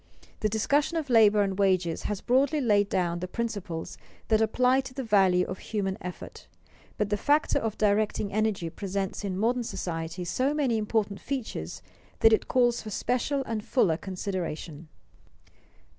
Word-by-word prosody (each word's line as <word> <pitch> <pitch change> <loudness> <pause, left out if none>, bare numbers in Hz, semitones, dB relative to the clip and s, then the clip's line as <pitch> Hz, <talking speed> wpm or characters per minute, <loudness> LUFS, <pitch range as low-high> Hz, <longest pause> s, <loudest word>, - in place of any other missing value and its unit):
The 215 - +1
discussion 280 +9 +1
of 295 -5 -3
labor 215 -3 +6
and 195 0 -3
wages 185 -4 +1
has 205 -2 -3
broadly 275 +5 +2
laid 205 -6 +2
down 175 -2 0
the 180 - -4
principles 200 -6 -4 0.3
that 220 -1 +4
apply 250 +4 +3
to 260 -1 -10
the 270 - -3
value 190 -5 +3
of 185 - -6
human 195 -3 -2
effort, 180 0 -8 0.5
but 210 -1 -1
the 205 - +2
factor 290 +8 +2
of 225 -2 -3
directing 210 -1 +1
energy 210 -6 0
presents 195 +1 -3
in 190 -2 -3
modern 240 +4 +1
society 170 -4 -4
so 260 - 0
many 260 -7 +1
important 210 -2 -1
features 90 - -5 0.4
that 225 - +7
it 220 - +2
calls 240 -2 +2
for 215 - -7
special 255 +6 -1
and 225 -4 -4
fuller 195 - +2
consideration. 175 -4 -5
210 Hz, 160 wpm, -27 LUFS, 185-240 Hz, 0.5 s, that